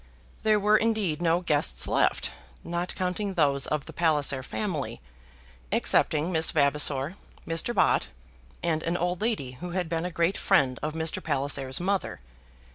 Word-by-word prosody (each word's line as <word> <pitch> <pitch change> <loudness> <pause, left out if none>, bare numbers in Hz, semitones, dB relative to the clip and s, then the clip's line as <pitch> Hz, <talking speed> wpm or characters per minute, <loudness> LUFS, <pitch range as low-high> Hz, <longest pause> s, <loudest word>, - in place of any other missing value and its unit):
There 215 -1 +3
were 210 +1 +4
indeed 215 -9 0
no 170 +1 +2
guests 150 -4 +2
left, - - +1 0.3
not 175 +1 -3
counting 190 +1 -2
those 140 -5 +2
of 150 -2 -2
the - - -10
Palliser 150 -5 +1
family, 140 - -4 0.7
excepting 155 +4 +2
Miss 160 -2 +2
Vavasor, 145 +2 +1 0.3
Mr. 165 +9 -1
Bott, - - +3 0.6
and 160 -2 +1
an 170 +2 -1
old 175 +2 -2
lady 140 - -2
who 175 -1 -5
had 180 -2 -1
been 165 0 -1
a - - -1
great 170 +2 0
friend 135 -10 +2
of 155 0 -3
Mr. 160 0 -1
Palliser's 135 -1 0
mother. 190 +2 -1
165 Hz, 150 wpm, -27 LUFS, 145-185 Hz, 0.7 s, were